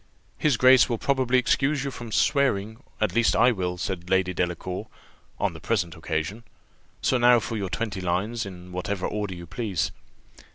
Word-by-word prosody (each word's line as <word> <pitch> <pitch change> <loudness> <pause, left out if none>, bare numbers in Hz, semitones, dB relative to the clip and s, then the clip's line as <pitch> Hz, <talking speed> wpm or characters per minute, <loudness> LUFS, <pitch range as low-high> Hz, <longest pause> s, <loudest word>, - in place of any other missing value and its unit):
"His 150 -6 +2
Grace 130 0 +6
will 120 - 0
probably 130 0 +1
excuse 135 +2 +1
you 140 - -3
from 120 -2 -8
swearing; 110 -5 +1 0.2
at 110 - 0
least 120 0 +3
I 125 - +5
will," 90 -5 -2
said 90 -1 -4
Lady 95 -1 +2
Delacour, 90 +3 -3 0.5
"on - - 0
the 80 - -9
present 90 -1 -1
occasion: 80 +7 -3 0.6
so 130 - +2
now 120 0 +6
for 115 +1 -4
your 100 -3 -3
twenty 105 -1 -3
lines 100 +7 -1
in 90 -2 -9
whatever 90 +1 -3
order 105 -3 -3
you 85 0 -9
please." 100 +2 -2
105 Hz, 170 wpm, -25 LUFS, 90-120 Hz, 0.6 s, Grace